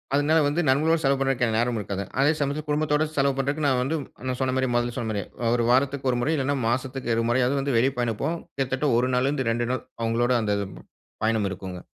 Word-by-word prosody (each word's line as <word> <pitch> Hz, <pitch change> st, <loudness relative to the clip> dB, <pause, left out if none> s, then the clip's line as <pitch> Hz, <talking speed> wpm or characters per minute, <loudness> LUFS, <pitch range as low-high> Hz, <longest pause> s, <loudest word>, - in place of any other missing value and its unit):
அதனால 155 Hz, +3 st, +3 dB
வந்து 150 Hz, +4 st, +1 dB
நண்பர்களோடு 155 Hz, +5 st, +3 dB
செலவு 135 Hz, 0 st, +3 dB
பண்றதுக்கு 135 Hz, -3 st, +1 dB
நேரம் 120 Hz, +1 st, +1 dB
இருக்காதுங்க. 100 Hz, -2 st, -5 dB
அதே 140 Hz, +2 st, +5 dB
சமயத்தில 145 Hz, +1 st, -2 dB
குடும்பத்தோட 150 Hz, 0 st, +1 dB
செலவு 140 Hz, 0 st, +2 dB
பண்றதுக்கு 140 Hz, +3 st, -1 dB
நா 140 Hz, -, +4 dB
வந்து 140 Hz, +5 st, -1 dB, 0.3 s
நா 130 Hz, -, -1 dB
சொன்ன 130 Hz, -1 st, +1 dB
மாரி 130 Hz, -1 st, +1 dB
முதல்ல 120 Hz, 0 st, 0 dB
சொன்ன 115 Hz, -, -2 dB
மாரி, 100 Hz, -2 st, -2 dB, 0.2 s
அ -, -, +2 dB
1 120 Hz, -, +1 dB
வாரத்துக்கு 135 Hz, +1 st, +2 dB
1 125 Hz, -, -1 dB
முறை 150 Hz, +6 st, +1 dB
இல்லைனா 140 Hz, 0 st, 0 dB
மாசத்திக்கு 130 Hz, 0 st, -1 dB
2 115 Hz, -, +1 dB
முறையாவது 130 Hz, +1 st, +1 dB
வெளிய 130 Hz, +4 st, +3 dB
பயண 120 Hz, -2 st, +1 dB
போவோம். 165 Hz, +4 st, -1 dB, 0.2 s
கிட்டத்தட்ட 135 Hz, +2 st, 0 dB
1 125 Hz, +1 st, +1 dB
நாள்ல 130 Hz, +2 st, +2 dB
இருந்து 135 Hz, -5 st, -1 dB
2 120 Hz, +1 st, -1 dB
நாள் 130 Hz, -, -2 dB, 0.2 s
அவங்களோட 115 Hz, +2 st, +1 dB
அந்த 105 Hz, -2 st, 0 dB, 0.7 s
பயணம் 110 Hz, -2 st, +1 dB
இருக்குங்க. 95 Hz, -1 st, -7 dB
130 Hz, 210 wpm, -25 LUFS, 120-140 Hz, 0.7 s, அதே